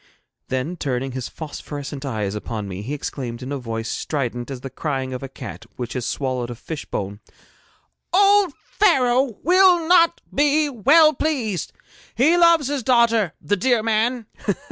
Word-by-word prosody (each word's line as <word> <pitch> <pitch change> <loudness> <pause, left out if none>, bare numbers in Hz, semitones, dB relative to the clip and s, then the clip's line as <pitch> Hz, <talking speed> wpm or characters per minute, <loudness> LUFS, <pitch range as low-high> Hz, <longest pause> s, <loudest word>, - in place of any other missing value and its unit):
Then 130 +7 -3
turning 135 -3 -2
his 130 -1 -5
phosphorescent 145 -2 -7
eyes 105 -6 -2
upon 105 0 -5
me, 95 0 -6
he 130 +8 -4
exclaimed 125 -4 -5
in 130 - -6
a 140 - -2
voice 115 -2 -4
strident 125 -4 -3
as 130 -3 -6
the 135 - -7
crying 135 -2 -3
of 125 - -5
a 135 - -6
cat 115 -3 -9
which 120 -1 -5
has 125 -3 -3
swallowed 130 -3 -2
a 120 - -6
fish 150 +5 -7
bone: 100 +1 -4 0.9
'Old 400 0 +5 0.3
Pharaoh 260 - +3
will 360 -1 +5
not 340 -1 +5
be 295 +1 +3
well 290 +6 +5
pleased. 245 - -2 0.4
He 305 +8 +4
loved 335 -3 +5
his 285 -1 -1
daughter, 230 -6 +3
the 205 - 0
dear 230 +3 +2
man!' 225 +2 0
160 Hz, 160 wpm, -22 LUFS, -, 0.9 s, Old